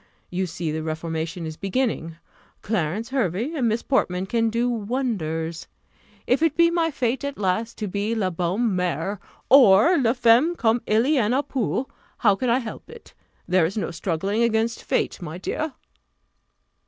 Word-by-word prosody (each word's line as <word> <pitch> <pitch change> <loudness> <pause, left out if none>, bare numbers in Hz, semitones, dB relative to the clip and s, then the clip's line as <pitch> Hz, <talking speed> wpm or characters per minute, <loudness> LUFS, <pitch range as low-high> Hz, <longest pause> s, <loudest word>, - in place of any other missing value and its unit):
You 185 +1 -1
see 165 -1 -4
the 160 +1 -3
reformation 160 +2 -4
is 155 0 -6
beginning 195 -6 -2 0.5
Clarence 210 +2 -1
Hervey 240 - -1
and 265 -7 0
Miss 225 +2 -1
Portman 185 -9 0
can 230 +3 +1
do 235 +2 0
wonders. 200 -9 -2 0.6
If 250 +5 +2
it 325 -3 +2
be 335 0 +5
my 335 -1 +1
fate, 260 -3 -1
at 280 0 -4
last, 210 +4 -1
to 215 - -3
be 205 +4 -2
la 190 -4 0
bonne 185 +7 0
mère, 180 +2 -1 0.3
or 255 - +6
la 235 -3 +2
femme 245 +7 +4
comme 230 -4 +1
il 220 +2 +3
y 300 +2 +2
en 215 +2 +1
a 280 - +1
peu, 260 -1 -1 0.3
how 205 -3 +4
can 250 +4 -1
I 235 - +4
help 230 -4 -7
it? 470 - -13 0.3
There 185 -1 +3
is 195 - -7
no 210 - -2
struggling 190 +5 -1
against 225 0 +1
fate, - - -1
my 165 0 -6
dear!" 305 - -3
220 Hz, 170 wpm, -24 LUFS, 180-250 Hz, 0.6 s, or